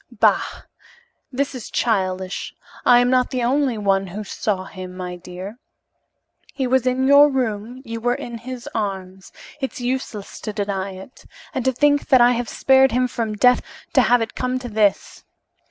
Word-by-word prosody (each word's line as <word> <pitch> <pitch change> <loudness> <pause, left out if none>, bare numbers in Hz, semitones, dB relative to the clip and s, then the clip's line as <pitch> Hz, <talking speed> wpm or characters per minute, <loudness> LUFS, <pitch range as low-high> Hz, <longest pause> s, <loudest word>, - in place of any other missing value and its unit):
"Bah! - - +1 0.7
This 275 +2 -1
is 250 -4 -7
childish. 190 -4 -1 0.3
I 245 - +8
am 245 +1 +2
not 255 -1 +3
the 255 -2 -2
only 260 -1 +1
one 195 -2 +1
who 200 +4 -6
saw 195 -1 -2
him, 185 -1 -9
my 180 -1 -5
dear. 180 +5 -9 1.0
He 265 - -1
was 255 0 +2
in 255 +1 +1
your 285 +1 +7
room 245 -1 -3
you 230 0 -5
were 245 +1 +1
in 235 -1 -7
his 250 +1 -8
arms. 190 -3 -4 0.3
It's 265 -2 -4
useless 245 -4 -4
to 215 - -5
deny 200 -2 -3
it. 190 +7 -13 0.3
And 260 - -2
to 260 - +4
think 290 +3 +2
that 260 - +6
I 240 0 +6
have 240 -1 -2
spared 265 0 +4
him 250 +2 +2
from 225 -3 -3
death 250 +4 +4 0.3
to - - +6
have 245 -1 +3
it 225 - -7
come 255 0 -2
to 250 -1 -6
this! 210 -2 0
235 Hz, 175 wpm, -21 LUFS, 200-255 Hz, 1.0 s, I